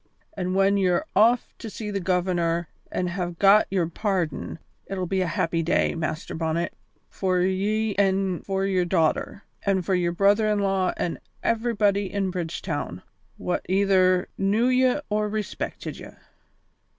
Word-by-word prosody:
An' 185 -1 -2
when 195 +1 +4
ye're 180 -3 +2
off 230 +4 +4
to 225 - -6
see 210 0 -6
the 200 - -1
Governor 175 -2 0 0.2
an' 180 - -1
hae 175 -1 -3
got 200 +3 +6
your 185 -3 +1
pardon, 180 -4 -2 0.3
it'll 185 -2 -3
be 190 +2 0
a 180 - 0
happy 165 0 0
day, 165 +2 +1
Master 160 -1 -4
Bonnet, 165 +1 -1 0.3
for 185 -2 0
ye 205 +4 0
an' 195 -2 +1
for 195 0 -1
your 190 -2 +1
daughter, 170 +3 0 0.2
an' 195 -2 +1
for 190 - -1
your 175 -1 +1
brother 200 +4 +3
in 210 -1 +2
law 195 -2 +1
an' 170 - -2 0.2
everybody 205 -4 +1
in 195 -2 -1
Bridgetown 165 - -4 0.3
wha 180 - -1
either 185 -2 +3
knew 205 +4 +2
ye 255 +2 +3
or 210 0 +1
respected 215 0 -4
ye." - - -9
190 Hz, 150 wpm, -25 LUFS, 175-200 Hz, 0.3 s, got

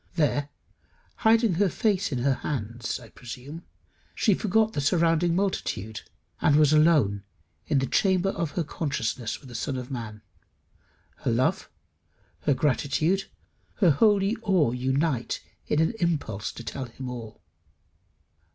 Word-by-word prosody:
There, 145 -3 +1 0.7
hiding 225 -2 +4
her 195 +3 +2
face 200 -2 0
in 130 - -1
her 140 0 +3
hands, 120 -4 -4
I 115 -3 -14
presume, 130 +9 -9 0.5
she 215 - +3
forgot 220 +3 +1
the - - -1
surrounding 165 +2 +2
multitude, 110 - -2 0.4
and 145 - +4
was 150 0 +5
alone 150 -11 +4 0.5
in 150 - +2
the 135 - +2
chamber 190 +5 +2
of 170 -4 -2
her 170 - +2
consciousness 130 -7 -3
with 135 - -14
the 125 - -11
Son 135 +2 -3
of 125 +1 -6
Man. 110 -4 -6 0.9
Her - - -2
love, 120 +3 +1 0.8
her 145 - +4
gratitude, 150 - +1 0.5
her 180 -6 +4
holy 200 +6 +3
awe 185 - +2
unite 130 +1 0 0.3
in 150 - +1
an 160 +7 +2
impulse 145 - -1
to 120 - -9
tell 130 +3 -5
him 130 +2 -8
all. 120 -3 -8
145 Hz, 140 wpm, -26 LUFS, 125-175 Hz, 0.9 s, was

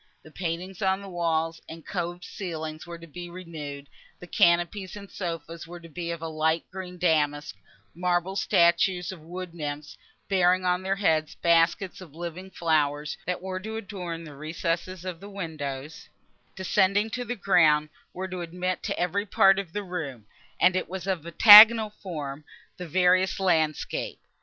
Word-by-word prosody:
The 155 - -15
paintings 175 +3 -5
on 190 -1 +2
the - - -9
walls 165 -2 -1
and 160 -1 -10
coved 175 -1 -4
ceiling 160 -5 -5
were 170 0 -7
to 170 - -12
be 175 +2 -9
renewed, 155 -6 -8 0.3
the - - -10
canopies 175 +3 +2
and 200 -1 -10
sofas 165 -2 -6
were 175 +1 -9
to 165 0 -13
be 170 +2 -5
of 170 -1 -5
light 160 0 0
green 180 -1 -7
damask; 150 - +1 0.4
marble 180 +2 -1
statues 180 0 +2
of 185 -4 -10
wood 175 +2 -7
nymphs, 150 -2 -6 0.3
bearing 185 -1 +3
on 180 0 +1
their 190 +1 -1
heads 160 -6 +1
baskets 170 +3 +2
of 160 -5 -13
living 175 +2 -7
flowers, 150 -4 0 0.3
were 185 0 -4
to 220 +3 -6
adorn 180 -6 -6
the 155 -3 -10
recesses 165 +4 -3
between 180 -3 -5
the 200 +2 -10
windows, 155 -6 -6
which, - - -40
descending 195 +3 +2
to 250 - -3
the 245 0 -4
ground, 155 -7 +3 0.2
were 190 +1 -5
to 185 -1 -5
admit 180 +2 -3
to - - -3
every 200 +4 -1
part 195 0 +5
of 190 -5 -6
the 205 +3 -4
room, 150 - -6 0.3
and 185 0 +4
it 185 - -2
was 185 -1 -5
of 180 -4 -2
octagonal 215 +4 +9
form, 155 -8 -7 0.3
the 180 - -7
various 185 +3 +3
landscape. 160 -5 0
175 Hz, 165 wpm, -26 LUFS, 160-190 Hz, 0.4 s, octagonal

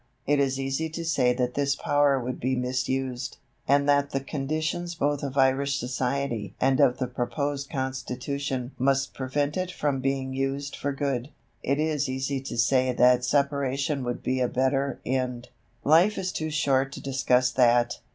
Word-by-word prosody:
It 145 0 +2
is 135 -1 +1
easy 135 +4 -1
to 165 +1 -5
say 135 -6 +3
that 125 0 -1
this 140 0 +1
power 145 -1 +2
would 125 0 -4
be 130 +2 0
misused, 130 0 -2 0.3
and 140 +1 +3
that 140 0 +3
the 135 - -1
conditions 155 +5 -3
both 145 -2 0
of 140 -1 -4
Irish 135 +1 +3
society 125 -3 -2
and 130 0 +2
of 125 - +4
the 130 - -1
proposed 135 +3 -3
Constitution 130 0 -3
must 135 +1 +1
prevent 145 +3 -1
it 185 -1 -1
from 145 -5 -1
being 135 0 -1
used 135 +1 -2
for 140 - -2
good. 140 -2 -2 0.3
It 140 - 0
is 150 -3 0
easy 130 +1 -2
to 135 - -6
say 130 +2 +3
that 125 0 +4
separation 140 +1 0
would 120 0 -4
be 130 0 0
a 125 - +2
better 135 +2 0
end. 125 -2 -2 0.3
Life 170 +8 +5
is 185 -1 -2
too 155 -3 -3
short 135 -3 +1
to - - -7
discuss 130 -2 +2
that. 120 -1 +3
135 Hz, 170 wpm, -26 LUFS, 130-140 Hz, 0.3 s, Life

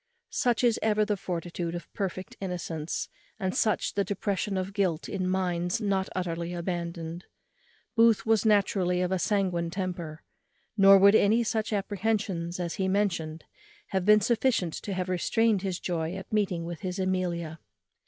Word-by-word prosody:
Such 245 -1 +1
is 235 -2 +3
ever 215 -1 +2
the 210 -1 0
fortitude 175 -2 -4
of 175 - -8
perfect 190 -1 -4
innocence, 170 -4 -3 0.3
and 190 -2 -2
such 215 -3 +1
the 200 - +1
depression 200 0 -2
of 185 +1 -3
guilt 185 -6 0
in 185 -2 -2
minds 180 -1 0
not 195 -3 0
utterly 170 -1 -3
abandoned. 170 -1 -4 0.7
Booth 230 -2 +4
was 220 -2 +3
naturally 195 -4 +2
of 180 0 0
a 190 - +1
sanguine 180 -4 0
temper; 175 -4 -5 0.5
nor 195 -1 +8
would 200 +1 +7
any 220 +2 +4
such 220 -1 -1
apprehensions 200 -4 -1
as 170 -2 -2
he 190 - +1
mentioned 175 -5 -1 0.5
have 190 -2 0
been 210 +2 +6
sufficient 225 -6 +1
to 200 - -5
have 185 0 -2
restrained 205 +3 +2
his 185 -2 -2
joy 170 -1 -2
at 190 +2 -8
meeting 190 -5 0
with 170 -2 -6
his 185 +2 -4
Amelia. 175 -4 -2
185 Hz, 155 wpm, -28 LUFS, 175-205 Hz, 0.7 s, nor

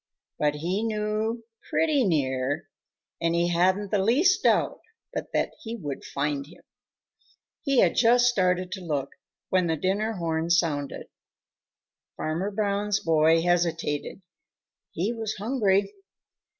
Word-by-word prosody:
But 150 -1 +1
he 175 +7 -2
knew 220 +1 -1 0.3
pretty 305 -4 +2
near, 145 - 0 0.5
and 165 0 +1
he 170 +1 +2
hadn't 185 +4 +1
the 205 - +2
least 345 - +3
doubt - - +2 0.3
but - - -5
that - - 0
he 230 -1 -5
would 145 - -6
find 140 0 -2
him. 165 - -17 1.0
He 275 -4 +3
had - - +4
just 240 +1 +5
started 185 -6 +1
to 190 0 -5
look 145 -5 -2 0.4
when 185 -2 +2
the 160 - +1
dinner 200 +7 0
horn 165 -3 -2
sounded. 155 -5 0 1.1
Farmer 165 +6 -2
Brown's 205 0 0
boy 165 0 +3
hesitated. 170 -1 -1 0.7
He 195 +8 -2
was 220 -2 -4
hungry. 200 -3 +1
185 Hz, 125 wpm, -26 LUFS, 160-215 Hz, 1.1 s, just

